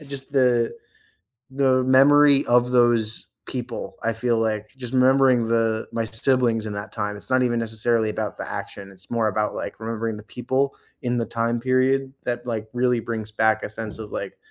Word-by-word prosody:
uh, - - -12
just 140 -1 -5
the 125 -4 +2 0.8
the 130 -1 +2
memory 140 +2 +5
of 125 +1 +3
those 120 -3 +3 0.2
people, 125 -2 -5
I 115 - 0
feel 115 +1 0
like 110 -1 -1
just 125 -1 -3
remembering 130 -2 +4
the 115 -1 0
my 115 - -1
siblings 115 -1 +1
in 105 - -5
that 100 +1 -6
time, 105 0 -3
it's 105 - -9
not 130 - +4
even 120 -1 +1
necessarily 115 0 +1
about - - -4
the - - -6
action, 100 -1 -7
it's 95 0 -13
more 115 -2 +1
about, 105 0 -1
like, - - -6
remembering 115 -1 -3
the 105 - -9
people 130 +4 -2 0.3
in 120 -1 -1
the 115 - 0
time 115 +1 -1
period 130 +2 +1
that, 120 0 -3
like, 110 -3 -3
really 125 -1 +2
brings 110 -2 -4
back 110 0 +2
a - - -4
sense 110 0 -6
of, 110 -1 -8
like, - - -5
120 Hz, 190 wpm, -23 LUFS, 110-130 Hz, 0.8 s, memory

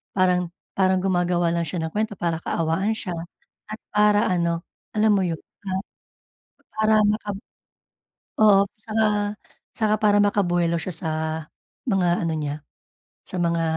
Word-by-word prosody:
parang 180 -2 +3 0.2
parang 185 -1 +2
gumagawa 175 -2 +1
lang 170 -1 -1
siya 165 +1 -3
ng 160 - -3
kuwento 215 +2 -1
para 170 -3 -1
kaawaan 170 +7 0
siya. 215 -4 -4 0.6
At 215 +1 -7
para 210 0 +4
ano, 170 -1 0 0.3
alam 215 0 +4
mo 205 - +4
yun, 170 -2 -1 0.3
ah 190 0 0 1.0
para 215 0 +4
maka 210 0 0 1.1
oo, 205 -2 +7 0.2
tsaka 210 -1 0 0.4
tsaka 215 -2 +1
para 205 -1 +4
maka 205 0 +2
buwelo 175 -1 +1
siya 180 +3 -4
sa 160 0 -3 0.7
mga 180 -7 +1
ano 165 - 0
niya, 150 0 -4 0.6
sa - - -6
mga 170 -1 +1
185 Hz, 140 wpm, -24 LUFS, 170-210 Hz, 1.1 s, oo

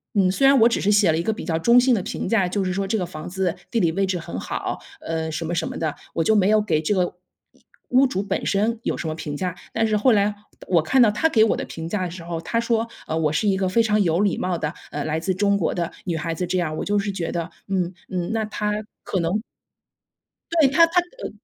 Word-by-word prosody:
嗯， 190 -2 +4
虽 270 +7 +2
然 275 0 +6
我 235 - +7
只 - - 0
是 205 - +2
写 205 -5 +5
了 160 - 0
一 170 - -1
个 220 - 0
比 - - -7
较 165 -2 0
中 235 +7 +6
性 250 -1 +4
的 190 - -2
评 - - -4
价， 200 -6 +3
就 200 +1 -1
是 185 - -1
说 195 0 -1
这 220 +2 0
个 180 - -1
房 155 -3 -8
子 185 -1 -1 0.2
地 230 - +1
理 170 -4 +2
位 195 +1 +1
置 185 -2 -1
很 90 - -6
好， - - -3 0.2
呃， 160 -1 -3
什 160 +2 -3
么 175 +2 -2
什 165 - -1
么 - - -6
的。 155 -3 -2 0.2
我 165 - +1
就 220 - +3
没 195 -2 +4
有 215 0 +4
给 175 -7 +1
这 185 +6 0
个 180 -1 0 0.7
屋 260 +2 +5
主 195 -4 -2
本 - - -2
身 220 +3 +1
有 - - -1
什 165 - -4
么 155 - -3
评 150 -2 -5
价。 180 -2 -3 0.2
但 225 0 +1
是 215 -1 +1
后 250 +4 +4
来 205 0 +2 0.3
我 170 -3 +4
看 255 +12 +3
到 230 - +7
他 315 +10 +2
给 220 -6 +5
我 220 - +2
的 - - -4
评 165 0 -7
价 190 +1 -1
的 170 - -5
时 175 -1 -8
候， 170 -1 -4
他 230 +7 -1
说， 230 -1 0 0.2
呃， 160 - -1
我 155 -2 +1
是 205 +7 +1
一 190 -1 +2
个 190 -1 0
非 230 +5 +3
常 210 -1 +2
有 170 +1 +1
礼 200 -4 +1
貌 180 -2 -1
的， 150 -1 -2 0.2
呃， 145 - -3
来 155 +1 -1
自 185 +3 -1
中 200 +1 +2
国 170 - 0
的 170 -2 -2
女 175 - -1
孩 165 0 -3
子 180 - -2
这 185 0 0
样 160 -3 -1
儿， 155 - -5
我 - - -3
就 205 0 +1
是 200 0 -2
觉 175 -4 -3
得， 170 0 -3 0.2
嗯 185 -3 0 0.2
嗯， 180 +1 -2
那 220 -1 0
他 210 -1 -2 0.3
可 190 - -2
能 180 +6 0 1.2
对， 275 - +6
他 330 +5 +6
他， 355 +2 +3 0.2
呃 - - -4
190 Hz, 300 characters per minute, -23 LUFS, 165-215 Hz, 1.2 s, 我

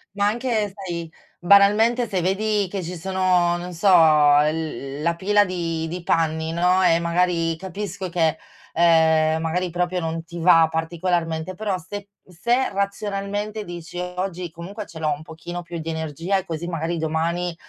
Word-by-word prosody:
Ma 200 0 +1
anche, 220 -2 0
sai, 170 -5 -6 0.3
banalmente 210 +6 +4
se 185 -2 -1
vedi 205 +2 0
che 195 0 -4
ci 180 +1 -6
sono, 180 -1 +1
non 180 +1 -7
so, 175 +4 -1
l 150 -3 +3
l - - -6
la 170 +1 +1
pila 205 +3 +3
di 165 -3 -3
di 175 +2 -5
panni, 160 -1 0
no, 180 +2 +2
e 165 -3 +4
magari 170 -1 +1
capisco 190 +1 -5
che, 165 -2 +1 0.4
uhm, 160 -1 +4
magari 170 +3 -1
proprio 180 +1 -1
non 165 -1 -3
ti 170 +1 -9
va 165 -1 +6
particolarmente, 165 +1 -2
però 200 0 -2
se 200 +3 -8 0.2
se 235 +9 0
razionalmente 200 +1 -3
dici: 175 -1 -8
"Oggi 180 0 -4
comunque 185 +6 -8
ce 165 - -12
l'ho 155 -1 0
un 145 +1 -3
pochino 175 +2 -7
più 170 0 -7
di 160 +1 -5
energia 160 +4 -2
e 190 - -4
così 165 -1 -5
magari 165 0 -2
domani 165 +2 -1
175 Hz, 165 wpm, -22 LUFS, 165-190 Hz, 0.4 s, va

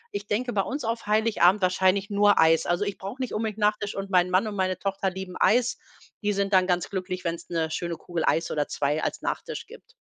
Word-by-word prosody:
Ich 405 - -4
denke, 245 +4 -1
bei 200 - +2
uns 275 +8 -4
auf 230 -1 -3
Heiligabend 210 -3 +3
wahrscheinlich 190 +2 +2
nur 205 0 +4
Eis. 160 0 +4
Also, 175 +4 +1
ich 200 - -4
brauche 200 +7 -7
nicht 255 - -3
unbedingt 215 -1 -2
Nachtisch 210 -1 0
und 195 0 -4
mein 180 -1 +4
Mann 185 +4 +2
und 210 - -5
meine 185 -1 0
Tochter 195 -1 -1
lieben 185 0 -7
Eis. 245 +2 +3 0.4
Die 205 0 0
sind 200 0 -1
dann 185 0 +5
ganz 180 -1 0
glücklich, 185 -1 -4
wenn's 170 -1 -4
'ne 160 -2 -1
schöne 170 +1 -3
Kugel 170 0 -4
Eis 165 - +1
oder 150 -1 -1
2 150 +2 -1
als - - -2
Nachtisch - - -4
gibt. - - -15
195 Hz, 225 wpm, -26 LUFS, 180-210 Hz, 0.4 s, dann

